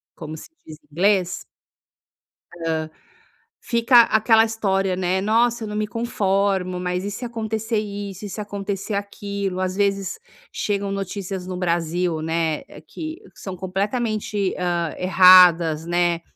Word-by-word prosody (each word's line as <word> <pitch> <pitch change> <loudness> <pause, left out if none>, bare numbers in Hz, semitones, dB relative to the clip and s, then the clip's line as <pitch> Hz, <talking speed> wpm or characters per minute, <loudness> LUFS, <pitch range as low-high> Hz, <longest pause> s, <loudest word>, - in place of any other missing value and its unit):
como 155 -1 -7
se 160 - -11 0.2
diz 155 -1 -10
em 150 - -31
inglês. 180 +2 +1 1.1
Hã, 165 -1 -4 0.9
fica 235 +1 +5
aquela 225 0 +4
história, 195 -4 0
né: 185 +1 0
"Nossa, 230 +3 +2
eu 215 - -4
não 210 - -5
me 210 0 -1
conformo, 195 -4 0
mas 180 0 -2
e 205 - -3
se 245 +5 -6
acontecer 225 -1 -2
isso? 200 -1 -6
E 205 - -6
se 200 - -7
acontecer 200 0 -4
aquilo?". 200 -1 -3
Ás 185 0 -1
vezes, 195 - -1 0.3
chegam 200 -1 -2
notícias 195 -1 -4
no 185 -1 -4
Brasil, 170 -1 -1
né, 160 -1 -1 0.3
que 315 +1 -7 0.2
são 190 -2 -7
completamente, 205 +1 -2
hã, 175 -2 -1
erradas, 180 -4 +6
né, 175 0 +1
195 Hz, 135 wpm, -22 LUFS, 180-210 Hz, 1.1 s, erradas